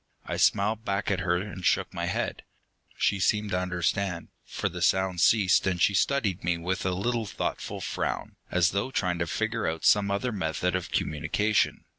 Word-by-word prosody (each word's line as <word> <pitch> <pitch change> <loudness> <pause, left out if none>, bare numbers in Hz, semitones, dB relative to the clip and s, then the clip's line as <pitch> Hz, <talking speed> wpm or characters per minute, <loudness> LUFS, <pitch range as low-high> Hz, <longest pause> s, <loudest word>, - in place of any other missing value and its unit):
I - - -3
smiled 110 +2 +2
back 100 -1 -1
at 95 - 0
her 90 -1 +1
and 95 0 -6
shook - - +1
my 85 - -2
head. 90 - -2 0.6
She 100 - +1
seemed 105 +4 +1
to 90 - +1
understand, 90 0 -1
for - - -3
the 90 +1 -6
sound 95 0 +2
ceased, 100 -4 +4
and 90 -2 0
she 100 - +4
studied 105 -4 +1
me 85 0 +1
with 90 +3 -2
a - - +1
little 115 +3 -1
thoughtful 90 - -4
frown, - - -3
as 85 -2 +3
though 100 +7 -1
trying 90 -8 -1
to 85 - -1
figure 110 +5 -1
out 80 0 -3
some 100 -1 +5
other 100 +5 -1
method 90 -2 -1
of 90 - -3
communication. 105 +8 0
95 Hz, 185 wpm, -27 LUFS, 90-105 Hz, 0.6 s, some